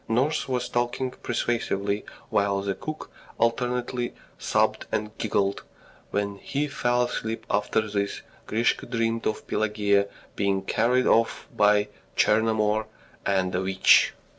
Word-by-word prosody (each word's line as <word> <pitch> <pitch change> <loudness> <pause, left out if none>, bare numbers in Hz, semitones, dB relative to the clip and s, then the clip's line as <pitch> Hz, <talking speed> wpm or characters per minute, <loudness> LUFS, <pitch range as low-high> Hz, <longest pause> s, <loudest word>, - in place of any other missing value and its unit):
Nurse 130 +7 +1
was 125 -2 -1
talking 120 +2 -1
persuasively, 105 -5 -1 0.3
while 100 -1 +2
the 100 0 -1
cook 155 +10 -7 0.3
alternately 120 +1 0 0.2
sobbed - - +1
and 105 0 -2
giggled. 100 -2 0 0.5
When 100 0 -2
he 140 +6 -2
fell 125 -3 +1
asleep 115 -2 -3
after 105 +2 +1
this, 100 -1 -2 0.2
Grisha 115 +2 +1
dreamed 115 -1 0
of 110 - -2
Pelageya 105 -2 +1 0.3
being 100 -1 0
carried 125 +6 +2
off 115 0 +2
by 105 -1 +4 0.3
Tchernomor 110 0 +2 0.4
and 95 -2 +1
a 90 - 0
witch. 95 0 +5
110 Hz, 120 wpm, -26 LUFS, 100-120 Hz, 0.5 s, witch